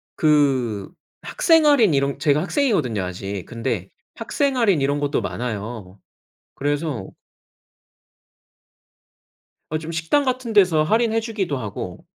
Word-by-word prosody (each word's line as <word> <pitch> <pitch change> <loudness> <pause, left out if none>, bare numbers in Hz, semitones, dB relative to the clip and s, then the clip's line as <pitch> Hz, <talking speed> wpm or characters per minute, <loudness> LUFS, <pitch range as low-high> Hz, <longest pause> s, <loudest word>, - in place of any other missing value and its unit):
그 135 - +1 0.3
학생 325 -2 +3
할인 240 - +5
이런 140 0 0
제가 150 +2 +2
학생이거든요, 185 - 0
아직. 95 +1 -5
근데 115 -5 -3 0.2
학생 270 +4 -1
할인 200 - +3
이런 140 +1 0
것도 145 0 0
많아요. 105 -4 -5 0.6
그래서 145 - -2 2.6
어 155 - -1
좀 160 +1 -7
식당 165 - +1
같은 255 -3 -2
데서 180 -7 +4
할인해 225 +6 +2
주기도 210 - -3
하고. 105 -6 -7
150 Hz, 240 characters per minute, -22 LUFS, -, 2.6 s, 할인